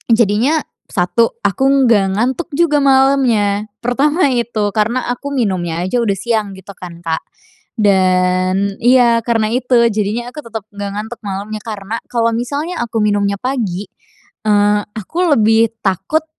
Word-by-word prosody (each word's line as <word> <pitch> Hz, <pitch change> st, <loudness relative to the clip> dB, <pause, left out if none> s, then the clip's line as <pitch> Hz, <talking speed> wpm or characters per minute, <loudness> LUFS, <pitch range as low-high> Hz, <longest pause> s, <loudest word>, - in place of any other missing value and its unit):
jadinya 235 Hz, +7 st, +2 dB, 0.3 s
1 225 Hz, +6 st, 0 dB
aku 205 Hz, +6 st, +1 dB, 0.2 s
nggak 200 Hz, -5 st, +3 dB
ngantuk 260 Hz, +9 st, -1 dB
juga 300 Hz, -2 st, +3 dB
malemnya. 265 Hz, -7 st, +2 dB, 0.2 s
Pertama 280 Hz, +5 st, +2 dB
itu, 225 Hz, -4 st, -1 dB
karena 225 Hz, +4 st, 0 dB
aku 280 Hz, +3 st, -7 dB
minumnya 180 Hz, -8 st, -1 dB
aja 190 Hz, +7 st, 0 dB
udah 205 Hz, -4 st, +1 dB
siang 215 Hz, -1 st, -1 dB
gitu 190 Hz, +1 st, -11 dB
kan, 175 Hz, -3 st, -10 dB
Kak, 160 Hz, -1 st, -1 dB, 0.6 s
dan 185 Hz, -1 st, +2 dB
iya, 240 Hz, -1 st, +4 dB
karena 225 Hz, -2 st, 0 dB
itu 250 Hz, 0 st, +2 dB, 0.2 s
jadinya 220 Hz, +4 st, -2 dB
aku 300 Hz, -, -7 dB
tetep 225 Hz, -3 st, -6 dB
nggak 200 Hz, 0 st, -5 dB
ngantuk 220 Hz, +3 st, -6 dB
malamnya. 205 Hz, +2 st, -5 dB
Karena 215 Hz, 0 st, -5 dB
kalau 230 Hz, -1 st, +1 dB
misalnya 285 Hz, +8 st, -3 dB
aku 230 Hz, -1 st, -3 dB
minumnya 200 Hz, -1 st, +1 dB
pagi, 215 Hz, -7 st, -3 dB, 0.6 s
eee, 205 Hz, 0 st, +3 dB, 0.2 s
aku 215 Hz, -, -7 dB, 0.2 s
lebih 225 Hz, +1 st, +4 dB, 0.2 s
takut, 195 Hz, -, 0 dB
220 Hz, 140 wpm, -16 LUFS, 200-245 Hz, 0.6 s, iya